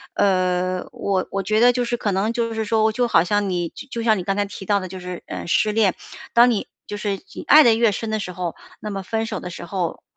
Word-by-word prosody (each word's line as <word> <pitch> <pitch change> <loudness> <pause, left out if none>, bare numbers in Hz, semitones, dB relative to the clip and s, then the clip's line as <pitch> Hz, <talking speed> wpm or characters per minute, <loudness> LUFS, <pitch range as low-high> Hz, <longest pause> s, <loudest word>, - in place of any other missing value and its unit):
呃， 185 -1 +1
我 190 -2 -1
我 195 0 -2
觉 215 +3 +1
得 245 +2 +6
就 245 0 -1
是 240 0 -1
可 210 - -1
能 200 +4 0
就 230 -1 -1
是 220 0 -1
说， 220 0 +2
我 220 - +3
就 245 +2 0
好 165 -8 +4
像 205 +3 0
你 175 -2 -1
就 245 +2 -7
像 220 -2 +3
你 185 - -3
刚 195 +1 -1
才 205 0 0
提 200 -1 -9
到 205 +1 +2
的 185 - -6
就 185 +1 -8
是， 180 -1 -7
呃， - - -6
失 210 +5 +2
恋， 210 -4 +2 0.4
当 240 +1 +7
你 215 - -2 0.2
就 205 - -6
是 205 -1 -2 0.2
你 - - -7
爱 305 +1 +9
得 235 - +6
越 225 -1 +3
深 220 +2 -4
的 215 - 0
时 185 -3 -5
候， 180 -2 -4 0.2
那 210 - -5
么 195 -1 -4
分 225 +3 -2
手 - - -4
的 - - -7
时 175 - -8
候， 175 -2 -3
205 Hz, 290 characters per minute, -22 LUFS, 185-225 Hz, 0.4 s, 爱